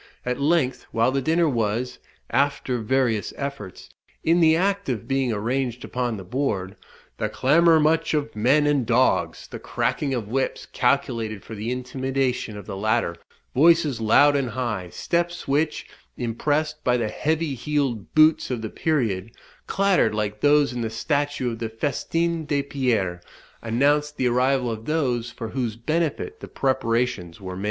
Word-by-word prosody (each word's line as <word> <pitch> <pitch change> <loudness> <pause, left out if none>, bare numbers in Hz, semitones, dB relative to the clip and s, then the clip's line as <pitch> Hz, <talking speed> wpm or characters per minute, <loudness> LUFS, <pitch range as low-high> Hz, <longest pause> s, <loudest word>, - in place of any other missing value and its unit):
At 125 +2 -2
length, 145 -3 +1
while 115 +3 +2
the 135 +1 0
dinner 165 +4 +2
was, 120 -1 -1 0.3
after 140 -3 +1
various 115 -2 0
efforts, 140 -10 -6 0.4
in 165 +2 +3
the 160 -1 +5
act 195 0 0
of 115 -6 -3
being 135 -2 +1
arranged 120 +3 -2
upon 125 -3 -2
the 95 - -7
board, 95 -3 -2 0.4
"the - - -1
clamour 165 0 +4
much 160 +1 +2
of 150 -4 -2
men 130 +8 +3
and 145 -3 +2
dogs," 120 +3 +1
the - - -8
cracking 140 -3 -1
of 115 -4 -3
whips, 130 +4 -2
calculated 120 -5 0
for 115 - -9
the 110 +2 -4
intimidation 130 -2 -2
of 100 - -9
the - - -6
latter, 110 -3 0 0.4
voices 155 -3 +4
loud 145 +6 +5
and 135 -3 0
high, 105 -7 -3
steps 175 - -2
which, 150 +3 0 0.3
impressed 150 +6 -1
by 125 -1 +3
the 115 -2 -1
heavy 155 +3 -1
heeled 135 -5 -2
boots 155 +1 +5
of 120 -3 -3
the 110 - -4
period, 115 - -1 0.4
clattered 195 - +2
like 105 0 -2
those 145 -2 +4
in 120 - -3
the 115 - -1
statue 140 +2 -1
of 115 - -7
the 115 -1 -3
Festin 165 +7 -1
de 140 -1 +1
Pierre,* 115 -11 -1 0.4
announced 145 +6 +1
the 130 - 0
arrival 125 0 +2
of 110 0 -6
those 125 -7 0
for 115 -1 -7
whose 120 -3 -2
benefit 165 - -2
the - - -8
preparations 115 -9 -1
were 95 -2 -6
made. - - -7
130 Hz, 160 wpm, -24 LUFS, 115-150 Hz, 0.4 s, the